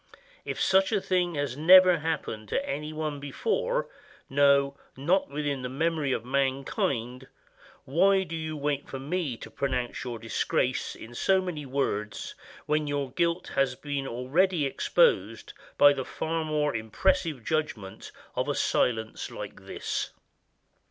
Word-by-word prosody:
If - - -4
such 190 +2 +3
a 210 - +2
thing 180 -3 0
has 145 -3 -2
never 180 +3 +7
happened 150 -9 -3
to 280 - -1
any 150 +2 -3
one 155 -2 -3
before, 485 - -1 0.4
no, 140 0 +4 0.2
not 175 +8 +1
within 145 -1 -2
the 125 - -4
memory 155 +1 0
of 115 - -2
mankind, 130 -2 -1 0.6
why 190 +7 +4
do 165 -2 -6
you 155 -1 -4
wait 145 0 -2
for 135 - -5
me 145 -2 -2
to - - -10
pronounce 130 -3 -2
your 120 -2 -4
disgrace 115 0 -1
in 115 - -11
so 190 +10 +3
many 170 -6 -4
words 105 -6 -2 0.3
when 150 0 0
your 140 -2 -2
guilt 170 +4 0
has 135 -2 +1
been 140 0 -4
already 150 +8 +1
exposed 475 - +1 0.2
by 145 0 +8
the 135 -2 -3
far 160 +4 -3
more 150 -3 0
impressive 155 - 0
judgment 140 -12 -3 0.2
of - - 0
a - - 0
silence 110 -2 0
like - - -9
this? - - -3
145 Hz, 145 wpm, -28 LUFS, 130-170 Hz, 0.6 s, by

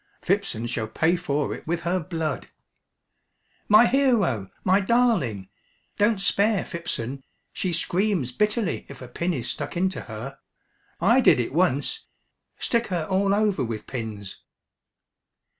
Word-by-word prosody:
"Phipson 190 - 0
shall 115 -2 -2
pay 160 +10 +2
for 150 -5 -1
it - - -10
with 170 +1 -1
her 175 +2 0
blood." 160 -3 -3 1.2
"My 215 +3 +8
hero 230 - +2
my 190 +2 +4
darling! 190 - +1 0.5
Don't 210 0 +3
spare 200 +1 +2
Phipson. 135 -6 -4 0.3
She 185 - -2
screams 175 - 0
bitterly 210 - 0
if 140 - -10
a - - -8
pin 170 +8 -2
is 125 -2 -4
stuck - - -4
into 185 +1 0
her. 120 +5 -8 0.6
I 230 +9 +4
did 155 - +5
it 120 - -2
once. 175 - 0 0.5
Stick 235 0 0
her 175 -5 -2
all 195 +1 +2
over 210 -7 +1
with 115 -3 -4
pins." 110 -6 -6
175 Hz, 135 wpm, -25 LUFS, 130-205 Hz, 1.2 s, My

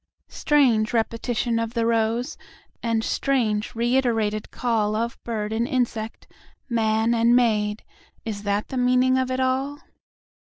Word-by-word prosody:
Strange 245 -8 +2
repetition 230 +1 0
of 230 +1 -3
the 230 -1 +1
rose, 230 +4 0 0.5
And 230 -1 0
strange 230 -6 0
reiterated 230 -3 +1
callOf 230 -1 -1
bird 220 -2 -3
and 230 +2 0
insect, 235 -5 -2 0.4
man 225 -1 +1
and 235 +1 +4
maid,—Is 220 - -2
that 205 0 -1
the 260 - -4
meaning 255 +1 +3
of 260 0 -1
it 255 0 -1
all? 265 +2 0
230 Hz, 120 wpm, -24 LUFS, 220-255 Hz, 0.5 s, and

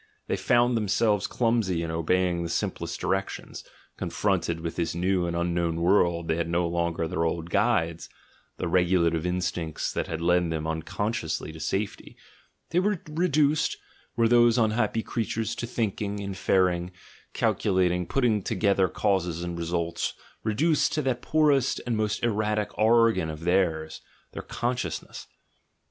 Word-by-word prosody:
They - - -1
found 120 0 +3
themselves 105 -1 +1
clumsy 115 -8 0
in 80 - -3
obeying 85 +2 +1
the 85 - -3
simplest - - -3
directions, 95 0 -3 0.3
confronted 85 -5 -1
with 85 0 -4
this 85 -1 -2
new 90 0 +1
and 85 - -2
unknown 85 -1 0
world 85 -2 +2
they 80 - 0
had 85 0 -1
no 85 0 +1
longer 85 -1 -1
their 80 - -1
old 85 0 -2
guides 85 -8 +1 0.2
— - - -35
the 90 - -2
regulative 85 -1 +2
instincts 90 -3 -2
that - - -2
had 80 - -4
led 90 0 +2
them 80 -1 -2
unconsciously 80 +2 -3
to 80 - -11
safety 95 +5 -3 0.3
— - - -44
they 170 - +3
were 200 -1 +1
reduced, 155 -2 +2 0.4
were 115 -1 +3
those 120 0 +5
unhappy 110 -1 +1
crea 115 - -2
tures, 115 +1 -2
to 120 - -3
thinking, 105 -3 -2
inferring, 95 -3 +1 0.4
calculating, 90 -3 +1
putting 120 -6 +1
together 100 -2 +2
causes 90 -4 0
and 85 -1 -4
results, 85 0 -2 0.3
reduced 150 +9 +2
to 150 - 0
that 125 -2 -1
poorest 145 -5 +2
and 120 -2 0
most 110 0 -1
er 120 - +3
ratic 105 0 -1
organ 110 -6 +3
of 75 0 -7
theirs, 85 -3 0 0.3
their - - -6
"consciousness." 120 -9 -4
95 Hz, 150 wpm, -26 LUFS, 85-115 Hz, 0.4 s, those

